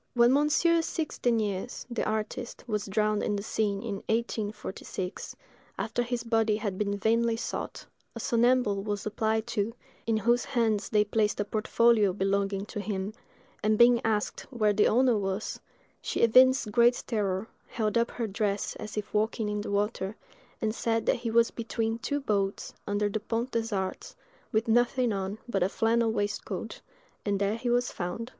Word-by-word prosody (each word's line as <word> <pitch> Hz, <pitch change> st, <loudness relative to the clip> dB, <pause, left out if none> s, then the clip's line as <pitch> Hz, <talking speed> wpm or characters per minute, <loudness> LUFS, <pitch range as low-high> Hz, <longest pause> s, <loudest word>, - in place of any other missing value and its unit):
When 240 Hz, +1 st, +5 dB
Monsieur 310 Hz, +4 st, +3 dB
Six 320 Hz, -1 st, -3 dB
Deniers, 220 Hz, -2 st, -1 dB
the 240 Hz, -2 st, -2 dB
artist, 220 Hz, +3 st, -3 dB
was 210 Hz, -3 st, -2 dB
drowned 210 Hz, +1 st, +1 dB
in 210 Hz, -, 0 dB
the 200 Hz, -, -3 dB
Seine 210 Hz, 0 st, -1 dB
in 205 Hz, -, -2 dB
1846, 210 Hz, -4 st, -3 dB, 0.4 s
after 245 Hz, -, -1 dB
his 240 Hz, -1 st, -2 dB
body 225 Hz, -2 st, +2 dB
had 205 Hz, -3 st, -3 dB
been 200 Hz, -1 st, 0 dB
vainly 230 Hz, +3 st, +2 dB
sought, -, -, -5 dB, 0.3 s
a -, -, -5 dB
somnambule 235 Hz, -3 st, +2 dB
was 205 Hz, -1 st, -3 dB
applied 220 Hz, +1 st, 0 dB
to, 215 Hz, +3 st, -2 dB, 0.3 s
in 225 Hz, -1 st, +2 dB
whose 235 Hz, +3 st, +2 dB
hands 225 Hz, -6 st, 0 dB
they 210 Hz, -2 st, +4 dB
placed 210 Hz, 0 st, 0 dB
a 205 Hz, -, +1 dB
portfolio 215 Hz, -1 st, +3 dB
belonging 195 Hz, 0 st, 0 dB
to 210 Hz, -, -6 dB
him; 200 Hz, 0 st, -3 dB, 0.5 s
and 215 Hz, 0 st, +2 dB
being 240 Hz, 0 st, +6 dB
asked 215 Hz, -2 st, -1 dB
where 215 Hz, -5 st, +2 dB
the 210 Hz, -, +4 dB
owner 250 Hz, +1 st, +4 dB
was, 195 Hz, +1 st, -3 dB, 0.4 s
she -, -, -2 dB
evinced 255 Hz, 0 st, +5 dB
great 240 Hz, +2 st, +4 dB
terror, 205 Hz, -2 st, -1 dB, 0.2 s
held 215 Hz, -1 st, -1 dB
up 235 Hz, 0 st, +2 dB
her 235 Hz, -, -3 dB
dress 205 Hz, -1 st, -1 dB
as 215 Hz, 0 st, -7 dB
if 210 Hz, 0 st, -4 dB
walking 215 Hz, +1 st, 0 dB
in 210 Hz, 0 st, -2 dB
the -, -, -5 dB
water, 200 Hz, 0 st, -1 dB, 0.4 s
and 215 Hz, -1 st, 0 dB
said 225 Hz, -1 st, 0 dB
that -, -, +2 dB
he 235 Hz, -1 st, -3 dB
was 230 Hz, +1 st, +4 dB
between 225 Hz, -1 st, -2 dB
two 285 Hz, +4 st, -1 dB
boats, 200 Hz, -7 st, -1 dB
under 205 Hz, 0 st, +1 dB
the 205 Hz, +1 st, -2 dB
Pont 230 Hz, +4 st, -2 dB
des 230 Hz, -1 st, -1 dB
Arts, 190 Hz, -2 st, -3 dB, 0.4 s
with 220 Hz, +2 st, +1 dB
nothing 240 Hz, +1 st, +2 dB
on 195 Hz, +1 st, -3 dB
but 200 Hz, -6 st, -1 dB
a 180 Hz, -, +3 dB
flannel 225 Hz, +2 st, +2 dB
waistcoat: 205 Hz, -2 st, -3 dB, 0.4 s
and 200 Hz, -1 st, 0 dB
there 200 Hz, +2 st, +1 dB
he 240 Hz, +1 st, -3 dB
was 245 Hz, +1 st, +2 dB
found. 180 Hz, +7 st, -4 dB
220 Hz, 170 wpm, -28 LUFS, 205-235 Hz, 0.5 s, being